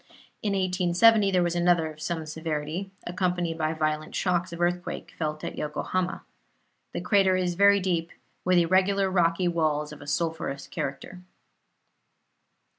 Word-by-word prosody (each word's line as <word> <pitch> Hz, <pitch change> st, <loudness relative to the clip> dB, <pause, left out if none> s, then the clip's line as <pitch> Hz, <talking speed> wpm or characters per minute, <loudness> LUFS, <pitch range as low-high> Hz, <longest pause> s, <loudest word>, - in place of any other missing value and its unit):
In 205 Hz, -2 st, -1 dB
1870 190 Hz, +3 st, +4 dB
there 185 Hz, -2 st, +2 dB
was 175 Hz, -1 st, 0 dB
another 175 Hz, -2 st, +2 dB
of 155 Hz, 0 st, -14 dB
some 160 Hz, 0 st, -3 dB
severity, 160 Hz, +3 st, -4 dB, 0.2 s
accompanied 175 Hz, -2 st, -1 dB
by 155 Hz, 0 st, 0 dB
violent 155 Hz, -1 st, -2 dB
shocks 180 Hz, -1 st, 0 dB
of 170 Hz, -, -7 dB
earthquake 175 Hz, 0 st, -2 dB
felt 155 Hz, -1 st, -3 dB
at -, -, -5 dB
Yokohama. 180 Hz, +5 st, -2 dB, 0.7 s
The -, -, -4 dB
crater 195 Hz, -3 st, +3 dB
is 180 Hz, -1 st, 0 dB
very 200 Hz, +2 st, +5 dB
deep, 175 Hz, -3 st, -1 dB, 0.3 s
with 185 Hz, 0 st, +3 dB
irregular 190 Hz, +3 st, +3 dB
rocky 175 Hz, 0 st, +2 dB
walls 155 Hz, -3 st, 0 dB
of 150 Hz, -, -11 dB
a 145 Hz, -, -11 dB
sulphurous 150 Hz, -3 st, -2 dB
character. 135 Hz, +7 st, -5 dB
175 Hz, 140 wpm, -27 LUFS, 155-185 Hz, 0.7 s, very